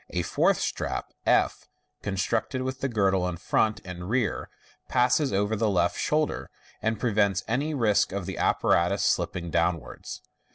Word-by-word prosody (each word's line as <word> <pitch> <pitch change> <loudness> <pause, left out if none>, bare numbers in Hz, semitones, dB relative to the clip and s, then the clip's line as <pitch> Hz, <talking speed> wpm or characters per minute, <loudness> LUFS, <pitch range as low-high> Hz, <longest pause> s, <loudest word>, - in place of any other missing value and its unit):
A - - -1
fourth - - +2
strap^, 65 - -2 1.0
con 100 -1 -3
aected 110 +6 -1
with 130 0 -4
the 135 - -1
girdle 95 -5 +2
in 85 - -5
front 110 +5 +1
and 90 0 -7
rear, 120 -4 0 0.4
passes 125 +4 +3
over 100 +2 +1
the 110 0 +1
left 90 -3 +1
shoulder, 155 0 0 0.3
and 110 -1 0
prevents 100 -5 +1
any 145 +7 0
risk 110 -6 +2
of 100 -1 -3
the 95 - -5
apparatus - - +2
slipping 85 -2 0
downwards. 85 +1 -2
105 Hz, 150 wpm, -27 LUFS, 95-125 Hz, 1.0 s, passes